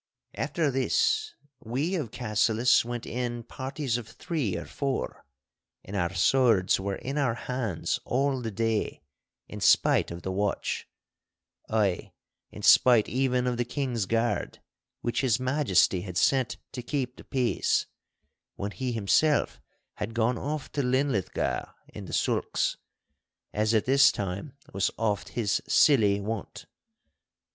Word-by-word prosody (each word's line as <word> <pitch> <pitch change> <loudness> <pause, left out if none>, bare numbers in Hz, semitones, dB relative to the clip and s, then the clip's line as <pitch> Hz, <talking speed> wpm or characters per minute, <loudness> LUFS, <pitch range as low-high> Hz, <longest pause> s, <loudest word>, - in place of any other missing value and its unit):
After 150 +1 -1
this 435 - +1 0.3
we 135 - -2
of 155 - -2
Cassillis 115 +1 +2
went 120 0 -5
in 120 -1 -3
parties 130 0 -3
of 115 - -10
three 115 - -3
or 85 - -6
four, 140 -2 -3 0.6
and 100 - -7
our 85 -3 0
swords 110 0 +3
were 100 0 -2
in 135 +7 -4
our 125 -5 +1
hands 120 -9 -2
all 135 0 0
the 115 - -3
day, 110 -6 -1 0.4
in - - -8
spite - - +4
of 85 0 -8
the 95 - -3
watch—ay, 100 0 -3 0.4
in - - -11
spite 120 -4 +6
even 125 -1 +1
of 125 -1 0
the 120 - +1
King's 125 -4 -2
Guard, 115 +2 0 0.4
which 120 +2 -1
His 130 -3 +2
Majesty 130 - +2
had 90 -1 -6
sent 130 +5 +2
to 125 - -5
keep 125 0 -3
the - - -13
peace, 130 -3 0 0.7
when 100 +1 -4
he 125 +2 -3
himself 115 +8 +2 0.4
had 110 +2 -4
gone 115 +1 +1
off 150 0 -4
to 145 - -1
Linlithgow 130 - 0 0.2
in - - -9
the - - -9
sulks, - - 0 0.8
as 110 +2 +1
at 110 - +2
this 135 +1 +6
time 100 +7 -5 0.2
was 95 0 +1
oft 105 -4 -1
his 105 -4 +1
silly 105 -9 +4
wont. 105 +1 -5
120 Hz, 135 wpm, -27 LUFS, 105-135 Hz, 0.8 s, spite